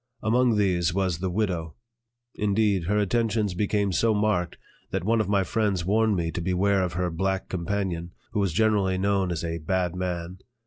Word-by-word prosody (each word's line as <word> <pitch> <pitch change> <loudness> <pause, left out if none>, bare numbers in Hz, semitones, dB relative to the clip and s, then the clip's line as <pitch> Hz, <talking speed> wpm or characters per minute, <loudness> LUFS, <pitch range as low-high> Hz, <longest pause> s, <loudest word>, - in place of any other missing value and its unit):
Among 120 +1 +3
these 90 -4 +1
was 95 -4 0
the 95 +1 -1
"widow"; 90 -5 -2 0.6
indeed, 100 -3 +1
her 105 +4 +1
attentions 110 -1 +1
became 100 +1 0
so 110 +5 +2
marked 105 -5 0 0.3
that 95 -2 -2
one 110 +3 +2
of 100 - -3
my 100 -1 +3
friends 100 -4 0
warned 110 +2 +2
me 85 -2 -1
to 85 - -4
beware 95 +3 +2
of 90 -1 -2
her 90 0 -1
black 95 +3 -2
companion, 90 -2 -3 0.2
who 105 - -1
was 100 -3 +1
generally 100 0 +2
known 100 -1 +1
as 85 -1 -3
a 85 0 -3
"bad 90 +2 -1
man." 90 0 -4
95 Hz, 180 wpm, -26 LUFS, 90-105 Hz, 0.6 s, Among